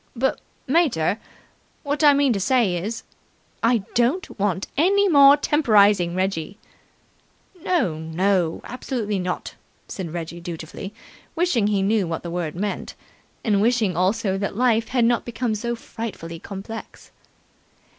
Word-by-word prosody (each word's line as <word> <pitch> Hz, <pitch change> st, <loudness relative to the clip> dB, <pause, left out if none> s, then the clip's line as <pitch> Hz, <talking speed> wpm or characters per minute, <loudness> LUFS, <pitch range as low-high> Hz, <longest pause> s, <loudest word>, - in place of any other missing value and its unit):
"But, 265 Hz, +3 st, 0 dB, 0.2 s
mater, 255 Hz, -, +2 dB, 0.6 s
what 290 Hz, 0 st, -1 dB
I 295 Hz, -, +8 dB
mean 280 Hz, -3 st, +3 dB
to 200 Hz, -, -1 dB
say 210 Hz, -2 st, +2 dB
is 210 Hz, +6 st, -4 dB, 0.3 s
" -, -, -38 dB
"I 230 Hz, -5 st, +1 dB
don't 245 Hz, -, 0 dB
want 195 Hz, -1 st, 0 dB
any 400 Hz, +7 st, +3 dB
more 285 Hz, -4 st, +7 dB
temporizing, 205 Hz, -, +3 dB
Reggie!" 190 Hz, 0 st, -2 dB, 1.1 s
"No, 240 Hz, -, 0 dB
no! 170 Hz, +1 st, 0 dB
Absolutely 235 Hz, -5 st, -3 dB
not!" 180 Hz, 0 st, -4 dB, 0.3 s
said 180 Hz, -5 st, -6 dB
Reggie 170 Hz, 0 st, -6 dB
dutifully, 170 Hz, +3 st, -7 dB, 0.4 s
wishing 325 Hz, -, +2 dB
he 200 Hz, -2 st, +1 dB
knew 205 Hz, -2 st, +1 dB
what 165 Hz, -1 st, -4 dB
the 170 Hz, -, -5 dB
word 170 Hz, -3 st, -3 dB
meant, 200 Hz, +3 st, -4 dB, 0.5 s
and 205 Hz, -3 st, +2 dB
wishing 220 Hz, -5 st, +2 dB
also 195 Hz, +2 st, +1 dB
that 200 Hz, 0 st, -3 dB
life 230 Hz, -2 st, +2 dB
had 245 Hz, -2 st, +2 dB
not 240 Hz, 0 st, +2 dB
become 235 Hz, -1 st, -2 dB
so 235 Hz, +3 st, -2 dB
frightfully 205 Hz, -8 st, -7 dB
complex. 200 Hz, +5 st, -9 dB
210 Hz, 135 wpm, -23 LUFS, 185-245 Hz, 1.1 s, I